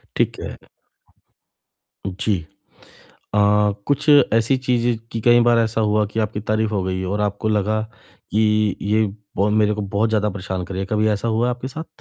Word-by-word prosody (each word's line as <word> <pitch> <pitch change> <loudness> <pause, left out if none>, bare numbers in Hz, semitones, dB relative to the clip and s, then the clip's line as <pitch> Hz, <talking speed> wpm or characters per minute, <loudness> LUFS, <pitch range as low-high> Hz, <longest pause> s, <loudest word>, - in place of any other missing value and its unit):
ठीक - - 0
है। - - -6 1.5
जी। 95 +1 -1 1.0
अ, 105 - +1 0.5
कुछ 145 +1 +1 0.2
ऐसी 115 +4 +3
चीज़ें, 120 -2 0
की 115 - -3
कई 120 +1 +5
बार 120 0 +4
ऐसा 115 0 0
हुआ 105 0 +2
हो, - - +2
कि 110 - -4
आपकी 105 -1 -2
तारीफ़ 110 +1 0
हो 100 -3 -1
गई 95 0 -2
हो 95 - -2
और 105 - -1
आपको 105 +1 -1
लगा, 105 +1 +1 0.5
कि 105 -1 +2
ये 110 +2 +2 0.3
बहुत 105 +2 +1
मेरे 105 -1 +3
को, 105 - -4
बहुत 100 +3 0
ज़्यादा 105 -1 +1
परेशान 95 -1 -4
कर 95 - -8
रही 95 - -3
है। - - -2
कभी 110 0 +2
ऐसा 105 +2 -1
हुआ 115 +2 +1
है, 125 - +1
आपके 125 +1 -6
साथ? 160 +4 -7
110 Hz, 195 wpm, -21 LUFS, 100-115 Hz, 1.5 s, कई